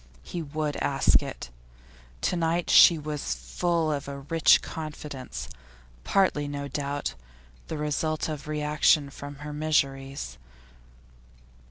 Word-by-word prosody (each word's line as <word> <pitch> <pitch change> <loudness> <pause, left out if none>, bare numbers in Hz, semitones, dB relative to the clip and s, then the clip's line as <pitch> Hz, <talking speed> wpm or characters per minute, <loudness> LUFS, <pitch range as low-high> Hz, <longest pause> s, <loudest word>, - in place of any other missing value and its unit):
He 170 - -5
would 150 -1 -3
ask 135 -1 +3
it. - - -7 0.7
To - - +1
night 170 0 0
she 170 - +8
was 150 - -3
full 155 - 0
of 140 -2 -3
a 140 0 -5
rich 160 +3 +4
confidence, 150 -4 -6 0.6
partly, 165 - +2
no 140 0 -4
doubt, 140 +1 -3 0.5
the 160 - -4
result 150 +1 -1
of 150 -2 -5
reaction 150 -1 +2
from 145 +1 -8
her 150 - -5
miseries. 135 - -1
150 Hz, 120 wpm, -27 LUFS, 140-155 Hz, 0.7 s, she